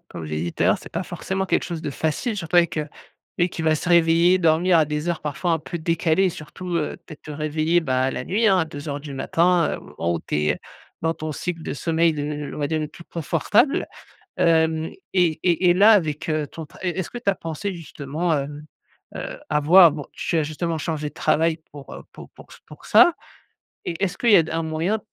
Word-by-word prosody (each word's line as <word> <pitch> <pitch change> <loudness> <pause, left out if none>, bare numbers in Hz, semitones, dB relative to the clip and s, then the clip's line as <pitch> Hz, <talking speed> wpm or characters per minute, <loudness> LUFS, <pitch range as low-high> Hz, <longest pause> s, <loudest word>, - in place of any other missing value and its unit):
comme 80 - -8
j'ai 75 0 -3
dis 85 0 -3
tout - - -2
à - - +4
l'heure, - - +3
c'est - - -11
pas - - -3
forcément 190 0 -3
quelque 190 - 0
chose 170 -2 -5
de 145 - -3
facile. 160 - -2
Surtout 175 -3 -2
avec, 170 -2 +3
heu, 150 0 -3 0.5
lui 175 0 +1
qui - - -6
va 160 -1 +2
se 155 - -4
réveiller, 170 +2 +5
dormir 170 +1 +3
à 155 - +5
des 150 +3 -2
heures 170 - -3
parfois 155 +4 -2
un 160 - +2
peu 165 +3 -6
décalées, 165 +2 +1
et - - +1
surtout, 175 +2 -6
heu, 150 - -2
peut - - -12
être 150 - -13
te - - -10
réveiller, 155 +3 0
bah 130 -2 +1
la 130 - -4
nuit 215 - +1
hein, 190 -2 +5
à 165 - +1
02:00 145 -1 -6
du 145 -1 -8
matin, 170 +5 +2
heu, - - -6 0.2
au 85 +1 0
o - - -3
tu - - -3
es 75 0 0 0.4
dans 165 - +1
ton 155 -1 -6
cycle 165 +2 -4
de - - -4
sommeil, 165 +2 +1
le 150 -2 -4 0.3
l - - -7
on - - -7
va 145 - -1
dire 160 -1 -1
le 150 - -3
plus 170 - -14
confortable. 170 - +1 0.5
Hem 160 -1 +2 0.2
et 170 -4 +2
et 175 0 +3
et - - +5
là, 205 +4 +7
avec, 155 -8 +1
heu, 155 -2 0
ton 160 +1 -9
tra - - -18
est 180 +1 -2
est-ce 185 - -2
que - - -10
tu 220 -4 +1
as 195 - -2
pensé 165 +5 -5
justement, 160 0 -3
heu, 140 -1 -1 0.7
heu, - - -6
à 150 -1 +1
voir, 170 +3 +8
bon, 145 -1 -6
tu - - -2
as 160 - +3
justement 160 +2 -3
changé 155 -1 -3
de 145 - -15
travail 160 +1 +1
pour, 140 -1 -10
heu, - - -9
pour - - -12
pour - - -16
ç - - -14
pour - - -14
ça 345 - +6 0.7
et 170 +3 -3
est-ce 190 0 -1
qu'il 235 - +2
y - - +9
a 170 - +6
d 160 - -7
un 165 0 -1
moyen, 165 +7 -1
160 Hz, 250 wpm, -23 LUFS, 150-175 Hz, 0.7 s, y